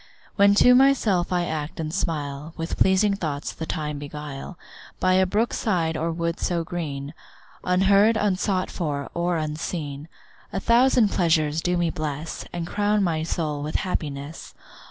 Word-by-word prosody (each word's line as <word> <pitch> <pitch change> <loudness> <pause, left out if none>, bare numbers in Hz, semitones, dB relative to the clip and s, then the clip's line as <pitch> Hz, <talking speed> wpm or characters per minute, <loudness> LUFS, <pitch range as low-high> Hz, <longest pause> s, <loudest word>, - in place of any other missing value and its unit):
When 200 0 +5
to 250 +4 +7
myself 250 -10 +3
I 175 -1 +1
act 155 -2 -4
and 155 -1 -3
smile, 150 -4 -3
With 165 0 -3
pleasing 190 +2 +3
thoughts 150 -6 -4
the 160 - -6
time 150 -2 -3
beguile, 145 +3 -7 0.4
By 185 0 +3
a 185 0 +4
brook 215 +5 0
side 170 -7 0
or 165 +1 -1
wood 170 0 -2
so 170 -2 0
green, 150 -4 -5 0.5
Unheard, 200 +4 +4
unsought 190 -2 0
for, 145 -5 -3
or 175 0 0
unseen, 150 -1 -4 0.4
A - - -2
thousand 235 0 +4
pleasures 160 -3 +2
do 180 +1 0
me 170 -1 +1
bless, 155 +1 -4
And 170 -1 -4
crown 205 +3 +1
my 165 -4 0
soul 155 -2 -2
with 150 +1 -5
happiness. 150 -5 -4
170 Hz, 155 wpm, -24 LUFS, 150-190 Hz, 0.5 s, to